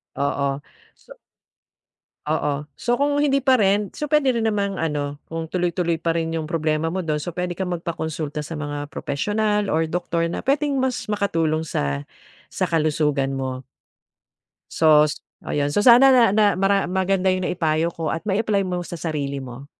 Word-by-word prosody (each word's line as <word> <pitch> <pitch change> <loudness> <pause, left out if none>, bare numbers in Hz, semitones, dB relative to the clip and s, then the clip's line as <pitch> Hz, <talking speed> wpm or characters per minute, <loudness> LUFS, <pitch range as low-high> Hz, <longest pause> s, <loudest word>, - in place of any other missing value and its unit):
Oo, 140 0 -1 0.4
so - - -16 1.1
Oo. 150 -1 -1
So 240 - -1
kung 290 +1 +1
hindi 275 -2 +3
pa 265 -1 +3
rin 200 +1 +2
so 300 -1 -4
puwede 275 -4 +3
rin 225 -1 +1
namang, 200 -2 -1
ano, 145 -2 -2
kung 165 0 -4
tuloy-tuloy 170 -1 -1
pa 165 0 0
rin 165 0 -2
'yong 160 -1 -3
problema 155 -1 0
mo 185 +1 -3
do'n, 150 -1 -1
so - - -4
puwede 180 +1 -3
kang 185 +1 -4
magpakonsulta 160 -3 -4
sa 155 +2 -6
mga 145 -1 -5
propesyonal 210 +8 -1
or 160 +1 +1
doctor 170 0 -1
na 170 - -3
puwedeng 285 +1 +1
mas 260 -1 -1
makatulong 165 -7 0
sa 70 - -2 0.5
sa - - -1
kalusugan 150 -4 0
mo. 130 -1 -4 1.1
So 155 -2 +5
s 150 - -4 0.3
ayun. 145 -1 0
So 205 - +2
sana 250 +3 +8
na 255 -2 +6
na 215 0 +4
mara 195 +1 +2
maganda 190 0 +1
'yong 185 -1 0
naipayo 165 -1 0
ko 165 -1 -3
at 165 - -4
mai-apply 205 0 +1
mo 180 -1 -2
sa 175 - -7
sarili 145 -4 -3
mo. 130 +1 -9
165 Hz, 170 wpm, -22 LUFS, 150-200 Hz, 1.1 s, sana